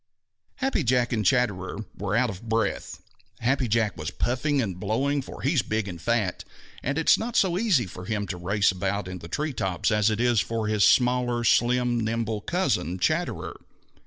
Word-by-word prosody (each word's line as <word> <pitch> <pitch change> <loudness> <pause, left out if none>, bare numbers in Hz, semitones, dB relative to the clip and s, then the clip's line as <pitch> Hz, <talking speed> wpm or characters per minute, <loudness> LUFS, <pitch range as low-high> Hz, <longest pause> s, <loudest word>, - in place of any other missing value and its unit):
_ - - -59 0.5
Happy 265 - 0
Jack 125 -1 +2
and 110 -2 0
Chatterer 100 -2 0
were 100 +1 -2
out 120 -1 +2
of 100 +4 -10
breath. 115 0 -2 0.4
Happy 130 +1 +1
Jack 110 -4 +1
was 75 -1 -4
puffing 140 +4 0
and 95 -8 -2
blowing, 135 +8 0
for - - -10
he 140 +5 +2
is 145 - +3
big 110 -2 -2
and 85 -4 -7
fat, 110 -5 0 0.4
and 140 +3 -2
it 160 - -1
is - - +6
not 230 +1 -4
so 185 -3 +3
easy 185 - +2
for 90 0 -9
him 105 0 -2
to 95 - -4
race 100 +4 +1
about 95 +1 -2
in 90 0 -6
the 85 - -9
tree 150 - -2
tops 95 -2 -1
as 105 0 +3
it 110 0 -1
is 120 -2 +3
for 115 -1 -2
his 105 -1 +2
smaller, 125 -1 +3
slim, 120 +1 +3
nimble 110 -1 -2
cousin, 95 - -1
Chatterer. 90 - -1
115 Hz, 195 wpm, -26 LUFS, 100-125 Hz, 0.5 s, is